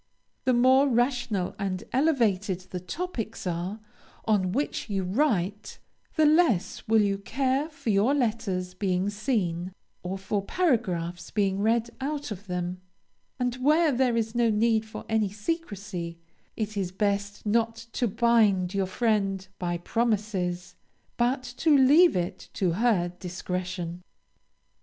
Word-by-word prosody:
The 255 - +4
more 260 +3 +5
rational 240 -6 0
and 195 0 -2
elevated 220 - +2
the 180 - -3
topics 225 - -5
are, 180 +4 -3 0.5
on 200 -4 +2
which 270 0 -2
you 195 -2 -1
write, 205 - 0 0.4
the 315 - +4
less 300 - +2
will 220 -1 +4
you 200 -1 0
care 265 +7 0
for 285 -7 -3
your 210 +8 +3
letters 205 -8 -1
being 185 +1 0
seen, 190 -6 -1 0.3
or 185 +2 -4
for 200 +1 -2
paragraphs 180 - 0
being 200 -2 0
read 230 +2 +1
out 290 -2 -3
of 200 0 -7
them; 180 0 -3 0.6
and 250 -1 0
where 305 +5 +4
there 250 -2 +2
is 225 -1 -1
no 240 -1 +3
need 220 +1 +2
of - - -6
any 220 -2 +1
secrecy, 205 - -4 0.4
it 215 -1 -3
is 190 -3 -2
best 200 +1 -1
not 225 +1 +1 0.2
to 240 - 0
bind 215 -4 +3
your 195 -1 0
friend 195 -3 0
by 175 -1 -1
promises, 190 -3 -1 0.4
but 250 +2 +1
to 310 -3 +4
leave 295 +7 +6
it 185 +1 -3
to 185 -3 +1
her 190 -2 +2
discretion. 180 -1 -4
210 Hz, 135 wpm, -27 LUFS, 185-245 Hz, 0.6 s, leave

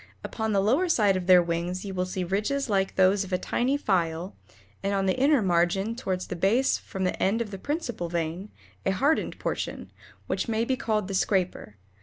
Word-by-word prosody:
Upon 220 -1 -3
the 200 -2 +2
lower 280 - +2
side 205 - +3
of 185 -1 -3
their 180 -1 +7
wings 170 +3 -3
you 195 - -5
will 185 0 -1
see 185 0 -3
ridges 215 +8 -1
like 195 -1 +1
those 190 +1 +4
of 190 - -10
a 180 - +2
tiny 255 +8 0
file, 175 - -1 0.5
and 200 0 -1
on 195 -1 0
the 190 - +2
inner 275 -2 +3
margin 185 +4 +1
toward 190 -7 -2
the 180 - -5
base 210 +10 +2
from 190 - -5
the 185 - -1
end 200 +4 +2
of 225 -3 -3
the 195 - -6
principal 245 - -3
vein, 170 +4 -3 0.3
a 190 - +1
hardened 285 +11 +1
portion, - - -4 0.3
which - - -2
may 225 0 0
be 260 - 0
called 215 -6 -1
the 195 - -5
scraper. 185 - 0
195 Hz, 205 wpm, -27 LUFS, 185-230 Hz, 0.5 s, their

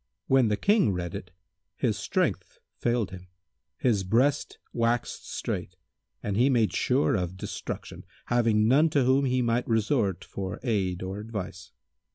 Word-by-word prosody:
When 130 -3 +4
the 105 -1 +1
King 200 - +3
read 85 -1 -3
it, 90 - -6 0.5
his 115 -5 0
strength - - -1 0.2
failed 120 -5 0
him, 95 0 -10 0.5
his 115 -9 +1
breast 125 +9 +1 0.2
waxed 115 0 -1
strait 90 - -4 0.5
and 100 - -2
he 125 +6 +4
made 115 -5 +2
sure 130 +3 +2
of 90 0 -2
destruction, - - -6 0.2
having 115 -3 +3
none 145 +7 +5
to 145 -3 +2
whom 130 +2 +3
he 130 -1 +1
might 120 +1 0
resort 110 - +1
for 95 -2 -5
aid 95 -7 0
or 95 +2 -4
advice. 100 -5 -6
115 Hz, 150 wpm, -27 LUFS, 95-125 Hz, 0.5 s, none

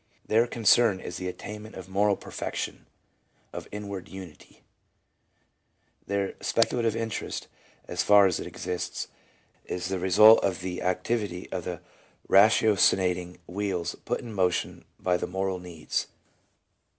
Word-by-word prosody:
Their 115 +2 +3
concern 115 -3 +4
is 90 - -6
the 90 - -4
attainment 105 +4 -8
of 95 -1 -8
moral 100 +2 +2
perfection, - - -5 0.7
of - - -7
inward 100 -2 -6
unity; 95 -5 -12 1.4
their 100 -1 -1
speculative 115 -1 +1
interest 115 -1 -4 0.2
— - - -31
as - - -1
far 100 -1 +6
as 90 -3 +1
it - - -5
exists 90 -1 -4 0.3
— - - -37
is 90 0 -4
the 95 -1 -1
result 105 +5 +7
of 95 -3 0
the 90 0 -4
activity 90 0 -2
of 90 -3 -4
the 90 -3 -5 0.5
ratiocinating 95 -4 +4
wheels 95 -1 -2
put - - -2
in 115 -2 -8
motion 90 -3 -1
by 90 -1 +1
the - - -3
moral 95 0 -2
needs. 85 -4 -4
95 Hz, 135 wpm, -27 LUFS, 90-105 Hz, 1.4 s, result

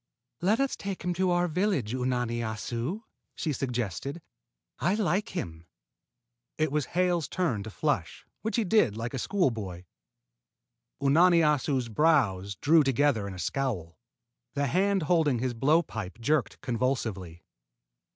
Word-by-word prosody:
"Let 205 +7 +2
us 275 -1 +1
take 195 -2 -5
him 180 0 0
to 185 +1 +1
our 175 0 +2
village, 165 - 0
Unani 125 -2 -1
Assu!" 115 - -3 0.3
she 155 - -2
suggested. 125 - -3 0.6
"I 180 +5 +2
like 200 0 -1
him." 85 - -5 0.9
It 155 -2 +1
was 150 -2 0
Hale's 175 -3 +2
turn 155 - -1
to 105 - -7
flush, 100 - -2 0.2
which 220 - -2
he 230 - +2
did 180 - +3
like 115 +3 -4
a 135 - -2
schoolboy. 110 - -1 1.2
Unani 170 +5 +5
Assu's 140 -4 +1
brows 110 - +2
drew 155 - +4
together 135 -5 +2
in 95 - -6
a - - -9
scowl. 90 - -3 0.6
The 140 - +1
hand 190 +5 +2
holding 155 -5 +2
his 125 +1 -1
blow 150 +8 +3
pipe 110 - -6
jerked 145 +3 0
convulsively. 110 -9 -2
135 Hz, 140 wpm, -28 LUFS, 115-175 Hz, 1.2 s, Unani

